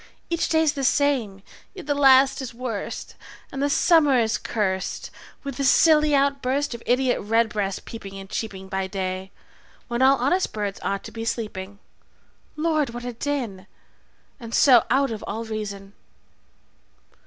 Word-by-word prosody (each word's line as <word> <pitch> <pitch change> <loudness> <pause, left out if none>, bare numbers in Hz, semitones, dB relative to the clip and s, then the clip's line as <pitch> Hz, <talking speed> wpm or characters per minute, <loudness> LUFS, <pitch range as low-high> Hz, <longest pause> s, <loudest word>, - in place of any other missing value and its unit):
Each 335 - 0
day's 320 -2 +3
the 275 -3 -4
same, 250 -9 +1 0.3
yet 375 - -9
the 290 - +1
last 270 -1 +5
is 245 -3 -7
worst, 235 -4 -5 0.4
And 270 - -4
the 285 - +1
summer 295 -3 +4
is 225 -2 +1
cursed 190 -4 -2 0.3
with 275 -3 -6
the 280 - -1
silly 300 +1 +5
outburst 275 0 +1
Of 235 - -8
idiot 250 +1 +2
red 225 +2 +2
breasts 200 -2 -2
peeping 195 -4 -8
and 195 0 -9
cheeping 190 -2 -5
By 190 0 -2
day, 190 0 -4 0.6
when 240 +1 -1
all 270 +1 +6
honest 285 +10 0
birds 205 -2 -3
ought 200 0 -2
to - - -9
be 225 - -6
sleeping. 205 -4 -4 0.8
Lord, 305 -3 0
what 240 0 -6
a 245 - -4
din! 235 -7 -4 0.7
And 230 -2 -5
so 250 -5 +6
out 270 +1 +2
of 220 - -5
all 225 +2 -4
reason. 200 -3 -6
240 Hz, 155 wpm, -24 LUFS, 205-280 Hz, 0.8 s, all